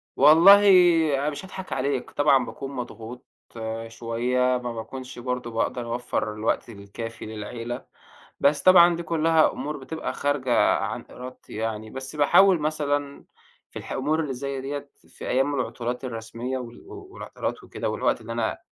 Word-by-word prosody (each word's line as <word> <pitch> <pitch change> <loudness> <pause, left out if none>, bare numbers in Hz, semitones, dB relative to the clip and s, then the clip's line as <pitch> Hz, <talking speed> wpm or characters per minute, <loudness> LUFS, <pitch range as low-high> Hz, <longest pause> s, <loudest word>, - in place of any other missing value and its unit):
والله 170 +7 +8 0.6
أنا 145 +2 0
مش 150 +6 -7
هاضحك 190 0 -7
عليك، 135 -1 -2
طبعًا 140 -3 +3
باكون 135 0 -7
مضغوط 125 -1 -7 0.6
شوية 115 +2 -2 0.2
ما 120 -1 -5
باكونش 125 +3 -8
برضه 125 -1 -3
باقدر 115 +1 -2
أوفّر 110 -3 -2
الوقت 110 +2 -1
الكافي 110 +2 -8
للعيلة، 115 +3 -6 0.5
بس 145 0 +3
طبعًا 175 -2 +7
دي 170 - -5
كلّها 160 -1 +3
أمور 150 +1 -5
بتبقى 150 +4 -5
خارجة 140 -4 +2
عن - - -4
إرادتي 125 +1 -10
يعني، 110 0 -4
بس 130 +5 -7
باحاول 175 +5 +5
مثلًا 145 -2 -2 0.4
في - - -8
الح - - -10
أمور 150 +4 0
اللي 140 -4 -3
زي 135 +1 -4
ديَّة 140 +1 -5 0.2
في - - -10
أيام 135 +3 +1
العطلات 125 +1 -3
الرسمية 115 +2 -5
وال 120 -2 -9
و 400 -2 -10
والعطلات - - -5
وكده - - -4
والوقت - - 0
اللي - - -8
أنا - - -1
130 Hz, 150 wpm, -25 LUFS, 120-145 Hz, 0.6 s, والله